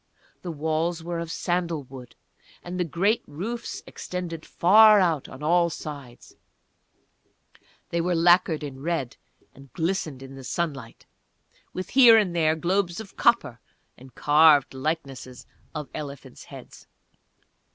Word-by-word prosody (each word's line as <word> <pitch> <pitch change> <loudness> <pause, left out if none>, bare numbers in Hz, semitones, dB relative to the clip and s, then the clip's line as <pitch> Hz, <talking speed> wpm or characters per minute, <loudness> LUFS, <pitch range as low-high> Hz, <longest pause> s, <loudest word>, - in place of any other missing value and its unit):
The 180 - -7
walls 160 +2 -2
were 170 0 -4
of 165 -1 -5
sandal 170 -3 -2
wood, 130 -2 -12 0.5
and 180 +1 -6
the - - +2
great 190 +7 0
roofs 205 +11 -6
extended 170 -3 -7
far 210 +4 +6
out 165 -7 0
on 130 +3 -11
all 170 +2 +3
sides; 140 -6 -9 1.6
they 170 - -1
were 175 +1 0
lacquered 170 -2 +3
in 135 -2 -8
red 155 -5 -3 0.4
and 135 0 -17
glistened 160 -6 -3
in 135 0 -11
the 135 -1 -11
sunlight, 140 -6 -5 0.7
with 185 -1 -6
here 240 -3 +7
and 190 -5 +1
there 160 -1 +2
globes 175 +2 -1
of 220 -3 -10
copper, 145 - +2 0.4
and 130 -1 -16
carved 150 -1 +4
likenesses 135 -3 -5 0.3
of 150 -2 -5
elephants' 140 -2 -9
heads. - - -13
165 Hz, 130 wpm, -25 LUFS, 140-180 Hz, 1.6 s, here